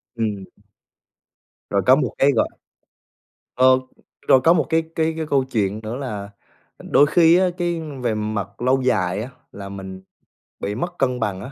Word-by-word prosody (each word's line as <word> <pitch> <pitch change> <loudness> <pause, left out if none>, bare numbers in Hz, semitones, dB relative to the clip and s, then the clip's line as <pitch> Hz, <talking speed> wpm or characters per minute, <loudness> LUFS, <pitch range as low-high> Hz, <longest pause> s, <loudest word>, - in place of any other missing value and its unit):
Ừm. 105 -4 -2 1.3
Rồi 100 -1 +1
có 130 - +7
một 135 -4 -1
cái 140 +1 +4
gọi 115 - +1 1.1
Ờ, 130 0 +5 0.5
rồi 130 - +6
có 165 +6 +5
một 165 -3 +1
cái 160 0 +2
cái 160 0 0
cái 160 -1 -3
câu 140 -3 +1
chuyện 110 -5 -2
nữa 110 +3 -5
là 105 -7 -5 0.5
đôi 145 - +3
khi 165 +2 +5
á, 185 0 +3
cái 175 -1 -1 0.2
về 115 -3 0
mặt 105 -1 -4
lâu 130 +1 +2
dài 100 -6 0
á 125 - -7 0.2
là 100 -1 -8
mình 95 -1 -8 0.6
bị 105 - -3
mất 175 +9 -4
cân 125 -2 0
bằng 100 -4 -2
á 125 - -8
125 Hz, 170 wpm, -21 LUFS, 105-145 Hz, 1.3 s, có